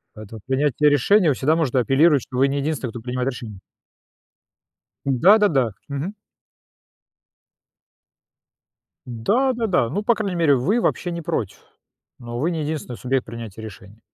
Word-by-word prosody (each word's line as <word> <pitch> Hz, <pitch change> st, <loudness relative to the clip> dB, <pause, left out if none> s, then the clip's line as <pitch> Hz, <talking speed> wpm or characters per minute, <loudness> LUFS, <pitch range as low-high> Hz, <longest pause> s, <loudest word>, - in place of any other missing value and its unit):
Поэтому 110 Hz, 0 st, -10 dB
принятие 145 Hz, +2 st, +2 dB
решения- 160 Hz, +4 st, +3 dB
всегда 150 Hz, +5 st, +1 dB
можно 135 Hz, -6 st, +1 dB
апеллировать, 140 Hz, +3 st, +3 dB
что 125 Hz, -, -7 dB
вы 135 Hz, -, +4 dB
не 140 Hz, +1 st, -2 dB
единственный, 140 Hz, -4 st, -2 dB
кто 115 Hz, 0 st, -8 dB
принимает 125 Hz, +2 st, -2 dB
решения. 110 Hz, -6 st, -8 dB, 1.5 s
Да-да-да. 145 Hz, -, +4 dB, 0.2 s
Мгм. 145 Hz, +9 st, -4 dB, 2.9 s
Да-да-да, 205 Hz, -, 0 dB
ну, 205 Hz, -, -2 dB
по 235 Hz, +2 st, +3 dB
крайней 200 Hz, -5 st, -3 dB
мере, 155 Hz, -4 st, +4 dB
вы 200 Hz, -, +1 dB
вообще 175 Hz, -, -1 dB
не 170 Hz, 0 st, -5 dB
против, 155 Hz, -, -3 dB, 0.6 s
но 120 Hz, -1 st, -7 dB
вы 160 Hz, +6 st, 0 dB
не 160 Hz, -3 st, -3 dB
единственный 145 Hz, -5 st, -4 dB
субъект 130 Hz, 0 st, -1 dB
принятия 115 Hz, -2 st, -8 dB
решения. 105 Hz, 0 st, -12 dB
140 Hz, 130 wpm, -22 LUFS, 120-170 Hz, 2.9 s, вы